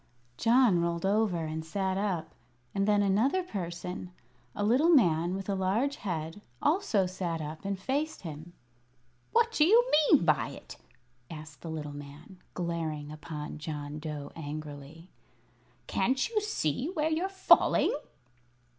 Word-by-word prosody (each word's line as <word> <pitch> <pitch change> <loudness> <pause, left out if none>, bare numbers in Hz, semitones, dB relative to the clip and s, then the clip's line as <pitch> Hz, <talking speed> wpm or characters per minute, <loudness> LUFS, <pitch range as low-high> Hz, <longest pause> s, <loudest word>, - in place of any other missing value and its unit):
John 230 - +4
rolled 170 +1 -1
over 195 -5 +1
and 160 0 -4
sat 190 +3 -1
up, 185 -5 -2 0.4
and 195 0 0
then 205 -1 +4
another 235 - +2
person 180 - -5 0.5
a 205 - -1
little 255 +10 +4
man 175 - +4
with 195 0 -5
a 200 - 0
large 200 +9 0
head 165 0 -4 0.2
also 300 - +2
sat 180 -2 -3
up 155 +4 -7
and 200 0 -1
faced 280 +9 -2
him. 160 +1 -8 0.8
"What 465 0 +3
do 315 - +3
you 470 +9 +5 0.2
mean 280 - +6
by 155 -3 +3
it?" - - -11 0.5
asked 155 -4 -10
the 165 - -7
little 150 -2 -5
man, 145 +6 -11 0.2
glaring 160 -4 -3
upon 155 -1 -7
John 150 -1 -5
Dough 150 -2 -6
angrily. 150 +1 -8 0.7
"Can't 260 - +1
you 435 -2 0
see 250 - -1
where 320 -3 0
you're 340 +5 0
falling?" 385 -1 +4
180 Hz, 140 wpm, -30 LUFS, 155-235 Hz, 0.8 s, mean